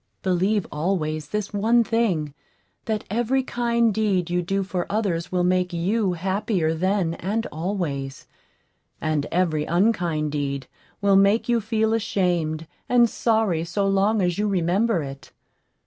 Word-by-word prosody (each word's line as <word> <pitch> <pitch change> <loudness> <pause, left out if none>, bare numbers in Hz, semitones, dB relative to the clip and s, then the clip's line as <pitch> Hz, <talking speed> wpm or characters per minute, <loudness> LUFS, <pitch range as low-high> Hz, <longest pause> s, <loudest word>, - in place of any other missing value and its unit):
Believe 190 +2 +1
always 155 -2 -1
this 210 +4 -3
one 230 +4 +3
thing 195 -11 0 0.5
that 220 -2 -2
every 240 +4 +1
kind 235 -2 +1
deed 195 -5 0
you 180 0 +1
do 195 +3 -1
for 185 -2 -3
others 190 -5 -1
will 180 -1 +1
make 180 0 +1
you 190 +3 0
happier 190 -1 0
then 185 0 0
and 210 +7 -2
always, 155 -6 -3 0.7
and 155 -2 -1
every 160 -4 +1
unkind 170 -5 +1
deed 140 -2 -2 0.4
will 200 -1 +4
make 200 +3 +3
you 235 -1 +2
feel 220 +1 0
ashamed 175 -8 0 0.2
and 240 -1 +5
sorry 220 -8 +1
so 195 +4 -1
long 195 +1 +2
as 175 +1 0
you 210 - +1
remember 190 0 +1
it. 135 0 -9
190 Hz, 140 wpm, -24 LUFS, 165-215 Hz, 0.7 s, and